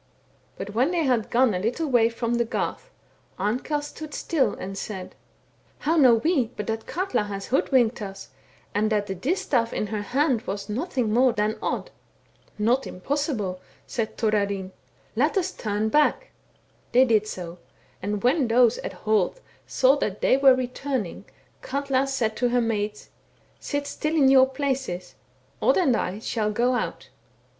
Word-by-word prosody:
But 205 Hz, -, -6 dB
when 250 Hz, +7 st, +2 dB
they 345 Hz, -2 st, 0 dB
had 245 Hz, -6 st, +1 dB
gone 245 Hz, -2 st, +3 dB
a 180 Hz, -, -1 dB
httle 240 Hz, -, -1 dB
way 240 Hz, -4 st, +4 dB
from 235 Hz, 0 st, -2 dB
the 235 Hz, 0 st, +2 dB
garth, 235 Hz, -, -3 dB, 0.5 s
Amkell 250 Hz, +9 st, -1 dB
stood 300 Hz, +1 st, -8 dB
still 265 Hz, -10 st, 0 dB
and 195 Hz, +1 st, -6 dB
said: 190 Hz, -2 st, -6 dB, 0.3 s
* -, -, -36 dB
How 320 Hz, +3 st, +3 dB
know 260 Hz, -7 st, +6 dB
we 265 Hz, +1 st, +1 dB
but 210 Hz, -, -3 dB
that 225 Hz, +1 st, -4 dB
Katla 370 Hz, -, -1 dB
has 200 Hz, -1 st, -5 dB
hoodwinked 245 Hz, -3 st, +2 dB
us, 195 Hz, -1 st, -7 dB, 0.4 s
and 215 Hz, +2 st, +1 dB
that 210 Hz, -1 st, +1 dB
the 195 Hz, -, -4 dB
distaif 235 Hz, -, 0 dB
in -, -, -2 dB
her 210 Hz, 0 st, -3 dB
hand 260 Hz, +2 st, +1 dB
was 200 Hz, +1 st, -4 dB
nothing 250 Hz, -2 st, -1 dB
more 250 Hz, +1 st, +4 dB
than 210 Hz, +1 st, 0 dB
Odd.' -, -, -3 dB, 0.4 s
* -, -, -37 dB, 0.2 s
Not 235 Hz, +5 st, +1 dB
impossible! 210 Hz, -, -2 dB
' -, -, -29 dB
said 225 Hz, -2 st, -3 dB
Thorarinn; 200 Hz, -3 st, 0 dB, 0.2 s
* 130 Hz, -, -35 dB
let 295 Hz, -, +2 dB
us 375 Hz, 0 st, 0 dB
turn 215 Hz, -, -2 dB
back.* 300 Hz, -, +2 dB, 0.6 s
They 255 Hz, +2 st, +6 dB
did 215 Hz, -3 st, +2 dB
so; 175 Hz, -3 st, -7 dB, 0.4 s
and 205 Hz, +2 st, -3 dB
when 260 Hz, +2 st, +3 dB
those 240 Hz, 0 st, +4 dB
at -, -, -5 dB
Holt 215 Hz, -, 0 dB, 0.3 s
saw 265 Hz, +2 st, +4 dB
that 210 Hz, -8 st, -2 dB
they -, -, +4 dB
were 270 Hz, -1 st, +6 dB
returning, 255 Hz, -4 st, -3 dB, 0.4 s
Katla 275 Hz, 0 st, 0 dB
said 240 Hz, -5 st, -1 dB
to 245 Hz, 0 st, +1 dB
her 245 Hz, +1 st, +2 dB
maids, 210 Hz, -2 st, -2 dB, 0.3 s
* -, -, -35 dB
Sit 285 Hz, -1 st, -3 dB
still 305 Hz, +2 st, -2 dB
in 275 Hz, -4 st, +5 dB
your 265 Hz, -1 st, +6 dB
places, 265 Hz, -10 st, -3 dB, 0.5 s
Odd -, -, +4 dB
and 280 Hz, -10 st, +3 dB
I 195 Hz, -2 st, -2 dB
shall 215 Hz, -1 st, -1 dB
go 240 Hz, +4 st, +2 dB
out.' 245 Hz, -, -3 dB
235 Hz, 170 wpm, -25 LUFS, 210-270 Hz, 0.6 s, know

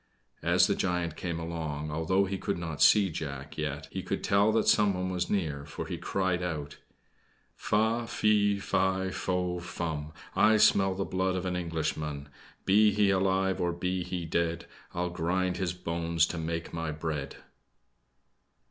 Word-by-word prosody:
As -, -, +4 dB
the -, -, +2 dB
giant 90 Hz, -3 st, -1 dB
came 85 Hz, -2 st, -3 dB
along, 80 Hz, -3 st, -4 dB
although 80 Hz, +6 st, +1 dB
he 95 Hz, 0 st, -3 dB
could 100 Hz, -, -2 dB
not 80 Hz, -4 st, -5 dB
see 100 Hz, +3 st, +6 dB
Jack, 70 Hz, -2 st, -6 dB
yet 75 Hz, -1 st, -3 dB
he -, -, -3 dB
could -, -, -3 dB
tell 100 Hz, +2 st, +4 dB
that 115 Hz, -, +2 dB
someone 95 Hz, -3 st, +3 dB
was 90 Hz, -1 st, -2 dB
near 80 Hz, -8 st, -1 dB
for 75 Hz, -, -6 dB
he -, -, -5 dB
cried 95 Hz, -2 st, 0 dB
out: 75 Hz, -5 st, -4 dB, 0.8 s
"Fa, 110 Hz, +2 st, +1 dB
fe, 105 Hz, -2 st, +2 dB
fi, 95 Hz, -1 st, 0 dB
fo, 90 Hz, -1 st, -1 dB
fum, 80 Hz, -3 st, -4 dB, 0.2 s
I 110 Hz, 0 st, +5 dB
smell 95 Hz, -2 st, +4 dB
the 95 Hz, 0 st, -2 dB
blood 95 Hz, 0 st, 0 dB
of 90 Hz, 0 st, -2 dB
an 90 Hz, -1 st, -1 dB
Englishman 80 Hz, -4 st, -3 dB, 0.4 s
Be 105 Hz, +2 st, +5 dB
he 100 Hz, -1 st, +3 dB
alive, 95 Hz, 0 st, +1 dB
or 85 Hz, 0 st, +1 dB
be 90 Hz, +2 st, -2 dB
he 90 Hz, -1 st, -4 dB
dead, 85 Hz, +1 st, -1 dB, 0.3 s
I'll 90 Hz, 0 st, -2 dB
grind 90 Hz, +2 st, 0 dB
his 90 Hz, -2 st, -1 dB
bones 85 Hz, -2 st, 0 dB
to 85 Hz, -, -4 dB
make 85 Hz, +1 st, -4 dB
my 80 Hz, -1 st, -2 dB
bread." 75 Hz, -3 st, -4 dB
90 Hz, 160 wpm, -29 LUFS, 80-95 Hz, 0.8 s, see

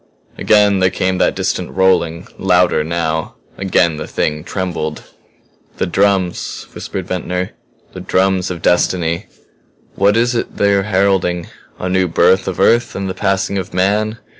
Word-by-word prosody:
Again 105 Hz, -2 st, +3 dB
there 95 Hz, 0 st, +3 dB
came 95 Hz, 0 st, -1 dB
that -, -, +2 dB
distant -, -, -2 dB
rolling 90 Hz, -3 st, +1 dB
louder, 90 Hz, -4 st, +3 dB
now. 80 Hz, -1 st, -2 dB, 0.2 s
Again 90 Hz, -4 st, +1 dB
the 75 Hz, -, -6 dB
Thing 75 Hz, 0 st, -2 dB
trembled. 85 Hz, -5 st, -4 dB, 0.7 s
"The -, -, 0 dB
drums," 95 Hz, -1 st, 0 dB
whispered 95 Hz, -, -5 dB
Ventnor. 90 Hz, 0 st, -3 dB, 0.4 s
"The -, -, -7 dB
drums 95 Hz, -1 st, +1 dB
of 90 Hz, -3 st, -6 dB
destiny. 90 Hz, 0 st, +1 dB, 0.7 s
What 100 Hz, +3 st, +2 dB
is 120 Hz, +1 st, +2 dB
it 115 Hz, -, -3 dB
they 100 Hz, 0 st, +3 dB
are 100 Hz, -, +3 dB
heralding? 95 Hz, -3 st, 0 dB, 0.3 s
A 90 Hz, -, -4 dB
new 95 Hz, 0 st, +1 dB
birth 90 Hz, +3 st, +3 dB
of 95 Hz, -, -3 dB
Earth 120 Hz, +1 st, +3 dB
and 95 Hz, 0 st, -3 dB
the 95 Hz, -, -3 dB
passing 95 Hz, +1 st, 0 dB
of 90 Hz, -, -7 dB
man? 105 Hz, +4 st, +1 dB
95 Hz, 150 wpm, -17 LUFS, 90-100 Hz, 0.7 s, Again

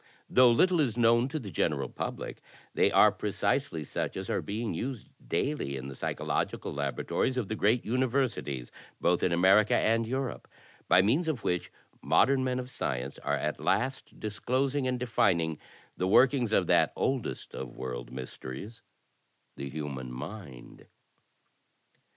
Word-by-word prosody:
"Though 125 Hz, -1 st, +6 dB
little 175 Hz, +9 st, +4 dB, 0.2 s
known 115 Hz, +1 st, +4 dB
to 150 Hz, +3 st, -3 dB
the 110 Hz, -10 st, -6 dB
general -, -, 0 dB
public, -, -, -5 dB, 0.3 s
they -, -, +3 dB
are -, -, +6 dB
pre -, -, -4 dB
cisely 80 Hz, -2 st, 0 dB
such -, -, -3 dB
as -, -, -4 dB
are -, -, 0 dB
being 110 Hz, 0 st, -3 dB
used 125 Hz, +6 st, -5 dB, 0.2 s
daily 85 Hz, -, -1 dB
in 65 Hz, +1 st, -6 dB
the 70 Hz, -, -8 dB
psychological -, -, -2 dB
labora 70 Hz, -1 st, -3 dB
tories 130 Hz, -, 0 dB
of 115 Hz, -6 st, -2 dB
the 110 Hz, -, -1 dB
great 110 Hz, +3 st, +2 dB
imiversities 120 Hz, -, -1 dB, 0.2 s
— -, -, -30 dB
both 90 Hz, 0 st, +2 dB
in 90 Hz, -, +2 dB
America 95 Hz, +5 st, +5 dB
and 115 Hz, 0 st, +2 dB
Europe 130 Hz, +1 st, -3 dB, 0.2 s
— -, -, -28 dB
by 90 Hz, -, +6 dB
means 140 Hz, -, +2 dB
of 140 Hz, -8 st, -2 dB
which 90 Hz, -2 st, -1 dB, 0.3 s
modem 135 Hz, -1 st, +3 dB
men 130 Hz, -1 st, 0 dB
of 130 Hz, 0 st, -5 dB
science 60 Hz, -, -3 dB
are 70 Hz, -, -1 dB
at 75 Hz, +1 st, -2 dB
last 130 Hz, +2 st, -1 dB
dis 105 Hz, -1 st, -5 dB
closing 135 Hz, +2 st, 0 dB
and 125 Hz, -1 st, -1 dB
defining 85 Hz, -10 st, +1 dB, 0.4 s
the 90 Hz, -, -1 dB
workings 125 Hz, +2 st, +4 dB
of -, -, +3 dB
that -, -, +3 dB
oldest 130 Hz, -3 st, -2 dB
of 65 Hz, -2 st, -7 dB
world -, -, -5 dB
mysteries— 65 Hz, -, -8 dB, 0.7 s
the 70 Hz, 0 st, -6 dB
human 70 Hz, -3 st, -5 dB
mind. 70 Hz, -, -9 dB
110 Hz, 160 wpm, -29 LUFS, -, 0.7 s, Though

